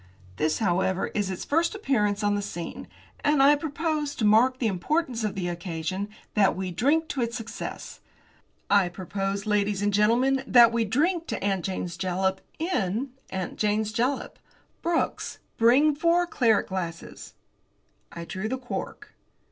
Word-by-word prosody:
This, 155 0 +1
however, 190 -2 0
is 205 -2 -1
its 185 - -5
first 335 +7 +1
appearance 210 - 0
on 205 0 +2
the 205 - 0
scene, 175 -4 -6 0.4
and 290 -2 +4
I 290 +2 +7
propose, 300 0 -2
to 220 - -1
mark 235 +5 +5
the 255 - -2
importance 235 - 0
of 210 - -2
the 185 -2 -2
occasion, 175 +2 -4 0.2
that 205 -2 +3
we 185 -1 -3
drink 290 - +2
to 270 - -2
its 235 0 -1
success. 225 -1 -7 0.7
I 200 -3 +4
propose, 195 +2 -3
ladies 205 -1 +1
and 205 0 +1
gentlemen, 245 +6 +3
that 240 -2 +7
we 230 -1 +1
drink 325 - +1
to - - -4
'Aunt 195 -3 0
Jane's 180 -3 -4
Jalap' 190 +1 -1 0.2
in 265 - -1 0.2
'Aunt 190 -1 -5
Jane's 215 0 0
Jalap.' 250 +4 -1 0.4
Brooks, 340 0 -1 0.2
bring 265 +7 +5
four 335 +4 +2
claret 235 -10 +2
glasses." 170 -3 -6 0.8
I 170 0 -7
drew 190 +5 -4
the 260 - -1
cork. 255 -1 -6
215 Hz, 155 wpm, -26 LUFS, 190-270 Hz, 0.8 s, I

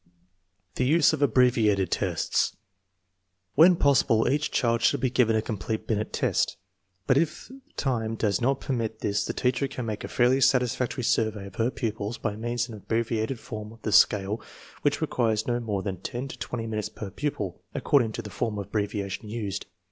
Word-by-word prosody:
The - - +2
use 155 +4 +4
of 150 - -2
abbreviated 115 -9 +3
tests. - - 0 1.0
When 170 - +7
possible 135 -7 +3
each 145 +4 +1
child 115 -2 +1
should 140 +4 +3
be 130 -1 0
given 115 -3 +3
a 110 - +1
complete 110 0 -3
Binet 110 -1 -1
test, - - 0 0.5
but 130 - +3
if 165 +8 -2 0.3
time 115 -5 -1
does 105 -1 0
not 135 +2 +1
permit 115 -4 -2
this 100 0 0
the - - -3
teacher 130 +2 0
can 130 -3 -5
make 110 -2 -4
a - - -4
fairly 125 +2 +3
satisfactory 125 -1 +2
survey 110 -3 +1
of 100 -2 -11
her 115 +1 +2
pupils 110 -3 -3
by 105 -2 -2
means 120 +2 -2
of 115 - -9
an 105 - -9
ab - - -32
breviated 115 +2 0
form 105 -1 -7
of 115 0 -16
the 110 - -1
scale 105 +2 +4 0.4
which 145 +1 +1
requires 115 -8 +1
no 120 -1 0
more 105 -5 -2
than 95 -3 -3
ten 120 +8 -5
to 125 - -9
twenty 115 +2 -4
minutes 105 -2 -3
per 105 -2 -7
pupil, 105 -8 -3
according 120 -6 +2
to 115 - -5
the 105 - -8
form 110 -1 -2
of 100 - -3
abbreviation 105 0 -3
used. 105 -3 -4
115 Hz, 185 wpm, -27 LUFS, 105-125 Hz, 1.0 s, When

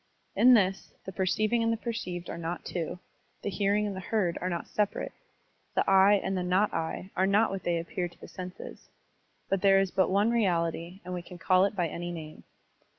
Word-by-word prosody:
In 250 +1 +7
this, 195 -3 0
the 190 - -5
perceiving 215 +5 +1
and 230 0 +2
the 230 - 0
perceived 185 -7 -4
are - - -5
not 170 +1 -4
two, 175 -1 -3 0.5
the 205 - -2
hearing 200 +2 +1
and 200 -2 -3
the - - -5
heard 190 -3 0
are 180 - -1
not 170 -2 -3
separate, 210 -1 -1 0.6
the - - +1
"I" 195 +1 +6
and 190 - -1
the 185 - -1
not 185 +4 +2
I 165 +4 -3
'* - - -36
are 190 +1 +2
not 205 +2 +3
what 195 -1 -4
they 175 0 0
appear 175 +2 -3
to 175 - -19
the - - -10
senses. 185 -1 -9 0.6
But 195 -1 0
there 195 -1 +6
is 195 -2 0
but 190 - +2
one 200 +4 +3
reality 175 -4 0
and 180 - -5
we 180 - -3
can 180 +1 -11
call 185 +1 +4
it 200 - -2
by 175 -3 +1
any 175 +2 -5
name. 155 -2 -8
190 Hz, 215 wpm, -29 LUFS, 175-200 Hz, 0.6 s, In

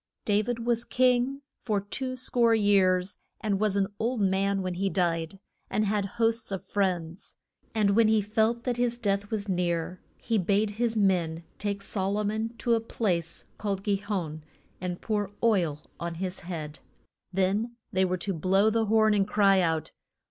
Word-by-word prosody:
Da 205 0 +3
vid 230 +1 -3
was 235 -1 +1
king 255 +3 +2 0.2
for 210 -4 0
two 255 +6 -4
score 240 -2 +3
years, 195 -3 +3 0.2
and 200 -3 0
was 210 -2 +1
an 200 -1 +3
old 235 +2 0
man 195 0 +1
when 185 -1 -2
he 195 +2 0
died 170 -1 -1 0.3
and 215 - +1
had 205 -1 0
hosts 225 -1 +1
of 195 - -4
friends. 180 -3 -2 0.4
And 210 -2 +3
when 225 +2 +5
he 220 0 +4
felt 220 +3 +1
that 245 -2 -1
his 240 -1 +1
death 200 -3 -1
was 215 -2 -2
near, 175 -1 -1 0.2
he 225 -2 0
bade 205 +3 +1
his 230 +1 -1
men 175 -5 +1 0.2
take 200 -1 -2
Sol 195 0 -1
o 210 - 0
mon 220 +2 -1
to 235 - +1
a 230 - +3
place 175 -7 -2
called 200 -2 -2
Gi 200 -1 +1
hon, 185 -7 -4 0.4
and 180 -1 -4
pour 205 -3 -1
oil 170 -10 +2 0.2
on 170 0 -4
his 185 +1 -3
head. 155 -5 -6 0.5
Then 195 +5 0 0.2
they 190 0 +3
were 185 0 +1
to 195 +2 -2
blow 190 +5 +3
the 225 0 +1
horn 220 0 +4
and 200 -1 +2
cry 200 -2 +4
out. 160 -3 0
200 Hz, 175 wpm, -28 LUFS, 185-220 Hz, 0.5 s, when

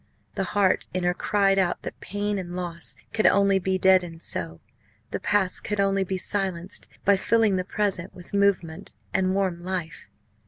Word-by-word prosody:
The 195 - -1
heart 190 -2 +3
in 185 - 0
her 180 0 +2
cried 195 +1 +2
out 180 -2 0
that - - -7
pain 205 0 -2
and 175 -1 -6
loss 175 -2 -3 0.2
could 215 - +3
only 200 -1 +4
be 190 0 0
deadened 180 -3 +3
so 80 -1 -2 0.5
the - - -2
past 200 -2 +1
could 210 -1 -2
only 195 0 +2
be 190 0 -3
silenced 190 -1 -1 0.2
by 200 - +6
filling 220 0 +2
the 185 - 0
present 195 -2 -1
with 180 +1 -11
movement 200 -5 0 0.2
and 190 0 +1
warm 185 -3 -1
life. 180 -2 -4
190 Hz, 170 wpm, -25 LUFS, 180-200 Hz, 0.5 s, by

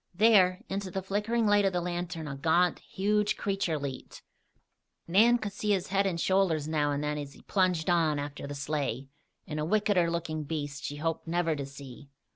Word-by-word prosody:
There, 190 -3 +5
into 195 0 -3
the 190 +1 -4
flickering 210 +4 0
light 205 -1 +4
of 195 -1 +1
the 180 - +1
lantern, 175 -2 -4
a 140 - -5
gaunt, 165 +5 +2
huge 210 +2 0
creature 195 -5 -1
leaped. 140 -2 -7 0.8
Nan 225 +8 +5
could 215 -3 -4
see 210 +1 0
his 190 -1 -1
head 195 0 +2
and 170 -3 -2
shoulders 175 -5 +2
now 150 -2 +1
and 145 +1 -2
then 150 0 -1
as 140 -1 -7
he - - -17
plunged 180 -5 +1
on 165 -4 +2
after 145 0 -5
the 145 - -6
sleigh, 140 -3 -3 0.4
and 155 -4 -4
a - - -1
wickeder 190 -1 +2
looking 165 -2 -3
beast, 145 -2 -4
she 145 - -4
hoped 165 +2 -3
never 165 -1 +1
to 140 -2 -5
see. 140 0 -11
170 Hz, 195 wpm, -29 LUFS, 150-195 Hz, 0.8 s, There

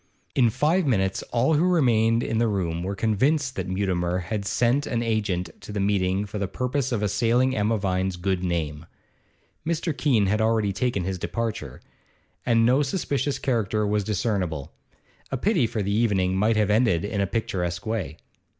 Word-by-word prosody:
In 120 -3 +4
five 150 - +1
minutes 95 -6 +1
all 120 +7 +2
who 155 +2 +3
remained 120 -10 +3
in 115 - -1
the 115 - +3
room 85 -5 -1
were 95 +3 -3
convinced 130 +7 +1
that - - -3
Mutimer 90 -2 -1
had 100 +3 -3
sent 125 +7 +1
an 120 -1 -1
agent 100 -7 -1
to - - -9
the 105 - -3
meeting 100 0 +1
for 105 +1 -6
the 100 - -1
purpose 130 +4 -2
of 110 -4 -1
assailing 120 +5 +2
Emma 110 +2 +1
Vine's 95 -2 -1
good 90 0 -1
name. 80 -3 -2 0.8
Mr. 165 -1 -1
Keene 125 -9 +2
had 105 +3 +1
already 110 -3 +1
taken 105 -1 -1
his 95 0 -3
departure, 110 - -4 0.7
and 115 -1 +4
no 130 +4 +4
suspicious 145 -2 -1
character 110 -4 0
was 105 0 0
discernible; 95 - -2 0.6
a 135 - -2
pity 165 - +2
for 110 -2 -2
the 100 +1 -1
evening 100 -4 +1
might 110 +4 +2
have 105 -1 +2
ended 105 -6 +2
in 105 -1 -2
a 100 - +1
picturesque 90 -5 -2
way. 100 -9 -3
105 Hz, 175 wpm, -25 LUFS, 95-120 Hz, 0.8 s, In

